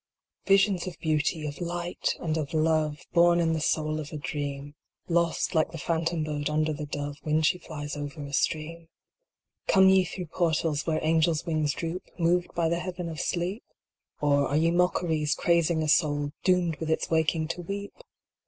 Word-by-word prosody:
yiSIONS 195 -2 +3
of 175 -3 -6
Beauty, 155 0 0
of 150 +3 -6
Light, 175 0 -2
and 160 -2 -1
of 155 -1 -3
Love, 155 0 +1
Born 175 0 +5
in 165 -1 +2
the 160 - 0
soul 155 0 0
of 150 -1 -7
a 155 - -5
Dream, 145 0 -4 0.3
Lost, 170 -1 +1
like 160 0 +2
the 165 - -7
phantom 165 0 -1
bird 150 -1 -2
under 155 +1 +1
the 150 0 -5
dove, 145 0 -4
When 155 +1 +1
she 180 +3 +2
flies 145 -3 -6
over 145 +1 -6
a 140 0 -8
stream 165 +3 -1 0.8
Come 190 0 +6
ye 190 0 +5
through 180 +1 -6
portals 160 -3 0
where 160 -1 +1
angel 160 +1 +3
wings 155 -4 0
droop, 170 +1 -4 0.2
Moved 175 +1 +1
by 170 -1 +2
the 170 +1 0
heaven 180 -1 -5
of 160 -2 -6
sleep? 185 +6 -2 0.6
Or, 145 -1 +3
are 145 - 0
ye 165 +2 +3
mockeries, 165 -4 +1
crazing 170 -1 +2
a - - -1
soul, 145 -1 +2
Doomed 180 -4 +2
with 160 - -4
its 160 - -1
waking 160 0 +1
to 170 +1 -3
weep 200 +3 -5
160 Hz, 180 wpm, -27 LUFS, 150-175 Hz, 0.8 s, Come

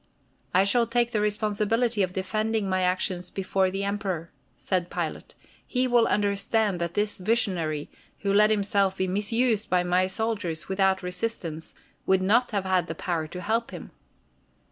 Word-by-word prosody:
"I 185 - +4
shall 230 +4 +2
take 235 0 +1
the 215 -3 0
responsibility 210 +2 0
of 185 -2 +1
defending 215 +3 -1
my 185 0 +1
actions 180 0 0
before 190 0 0
the 195 +1 -3
Emperor," 195 -5 -3 0.2
said 180 -2 -1
Pilate. - - -4 0.3
"He 255 0 0
will 240 -2 +4
understand 205 -1 +1
that 170 0 -3
this 205 -1 0
visionary, 180 -8 0 0.3
who 200 -1 0
let 210 +1 +5
himself 200 -2 +1
be 190 - 0
misused 215 +3 0
by 180 0 +3
my 180 +1 +2
soldiers 190 -6 -3
without 190 0 +1
resistance, 180 -4 -4 0.3
would 190 0 +3
not 235 +6 +3
have 200 -3 -2
had 185 -1 +1
the 160 - -5
power 165 -2 -2
to 180 +3 -7
help 225 +4 0
him." - - -9
195 Hz, 160 wpm, -26 LUFS, 185-215 Hz, 0.3 s, let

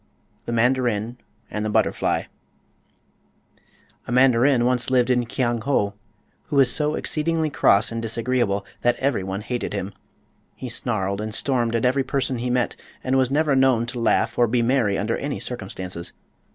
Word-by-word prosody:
THE - - -2
MANDARIN 120 -1 0 0.3
AND 105 - -3
THE 110 - -1
BUTTERFLY - - 0 1.8
A - - -5
mandarin 125 0 +4
once 125 0 +1
lived 130 -1 +3
in 125 -1 +1
Kiang 120 -1 -1
ho 105 -5 0 0.5
who 150 - -5
was 135 -3 +5
so 150 0 +2
exceedingly 160 0 -1
cross 105 -4 +3
and 115 0 -3
disagreeable 115 -3 -1 0.2
that 120 0 +2
everyone 100 -8 -2
hated 120 +1 -4
him. 100 0 -4 0.6
He 130 - -7
snarled 105 -4 -1
and 110 0 -4
stormed 120 -3 +1
at 115 - 0
every 130 +2 +2
person 130 -2 -2
he 125 +1 -2
met 125 -1 0 0.3
and 130 0 0
was 130 -2 +3
never 145 0 +2
known 130 -3 +3
to 120 +1 -5
laugh 115 - +1
or 120 - +5
be 120 +1 +1
merry 115 -5 +2
under 110 +3 -1
any 145 0 -4
circumstances. 95 -7 -6
120 Hz, 160 wpm, -23 LUFS, 110-130 Hz, 1.8 s, was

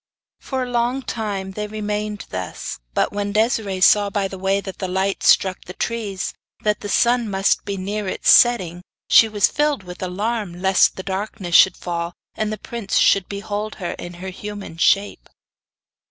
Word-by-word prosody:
For 265 -1 -3
a 250 - -6
long 245 +3 0
time 200 -5 -4
they 210 +2 -4
remained 210 0 -4
thus, 90 -1 -5 0.2
but - - +1
when 205 0 -2
Desiree 215 -3 0
saw 205 +2 +5
by 200 -1 -1
the 190 -1 -9
way 195 +1 +1
that 195 -1 -8
the 190 - -2
light 190 +2 -1
struck 190 -1 +3
the 180 - -8
trees, 210 -5 -3 0.3
that 210 -1 0
he 205 - -5
sun 235 +2 +2
must 195 0 +1
be 200 -1 -3
near 200 +2 -3
its - - +2
setting, 185 -8 +4 0.3
she 225 - +7
was 205 -2 +3
filled 295 -7 0
with 180 -1 -10
alarm 195 0 -3
lest 190 0 +3
the 190 - -6
darkness 190 -2 -4
should 190 0 +6
fall, 170 -1 -4 0.2
and 215 -1 -2
the 215 - -3
prince 220 -1 -3
should 195 -2 +4
behold 205 +1 -4
her 180 -4 -4
in 175 0 -7
her 185 +2 -7
human 205 -2 -8
shape. 200 +4 +1
200 Hz, 180 wpm, -21 LUFS, 190-215 Hz, 0.3 s, she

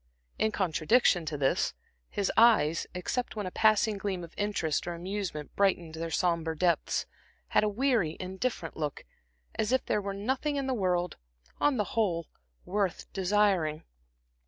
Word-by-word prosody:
In 220 - +2
contradiction 175 - +2
to 155 -1 -2
this, 135 -1 +1 0.3
his 200 - -1
eyes, 220 -9 +5
except 240 +8 -2
when 210 -2 -3
a 185 - -4
passing 215 0 +3
gleam 190 -3 -3
of 170 - -10
interest 205 -8 -1
or 175 - -2
amusement 180 -4 -4
brightened 175 -5 +1
their 165 +1 -4
sombre 165 -1 0
depths, 175 +1 +1 0.4
had - - +3
a 210 - +2
weary 220 - +1
indifferent 185 -1 -3
look, 150 -2 -4 0.5
as 215 +2 -1
if 260 -1 +2
there 210 - +1
were 200 0 -4
nothing 265 +8 -1
in 275 -1 -1
the 265 - 0
world, 180 -5 0 0.4
on 290 -3 +3
the 210 - +2
whole, 175 -7 +1 0.4
worth 195 -1 -2
desiring. 190 -5 +2
190 Hz, 155 wpm, -29 LUFS, 170-215 Hz, 0.5 s, eyes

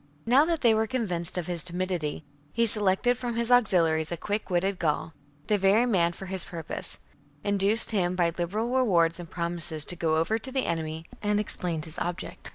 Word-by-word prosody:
1 235 - -1
8. - - +5
Now 285 +3 +6
that 330 -1 -2
they 235 -3 +4
were 220 0 0
convinced 185 -9 -3
of 175 - -3
his 175 -1 -4
timidity, 175 -3 -4 0.3
he 230 +6 +1
selected 215 +3 +4
from 240 -2 -4
his 235 +1 -1
auxiliaries 170 -9 +2
a 170 - -3
quick 205 +5 -4
witted 185 +2 -1
Gaul, 160 0 -2 0.3
the 210 -1 0
very 200 +5 +3
man 180 -8 +1
for 195 - -10
his 190 -1 -2
purpose, 165 -3 -7 0.5
induced 205 +3 +3
him 185 -4 0
by 170 -2 0
liberal 210 +7 -3
rewards 175 -10 +2
and 170 -2 -9
promises 170 -2 0
to 180 - -1
go 165 -2 0
over 215 +8 0
to 260 - -7
the 265 -1 -1
enemy, 160 -1 -4 0.2
and 210 0 0
explained 175 -6 +3
his 160 -1 -6
object. 175 +1 -5
185 Hz, 200 wpm, -26 LUFS, 170-220 Hz, 0.5 s, Now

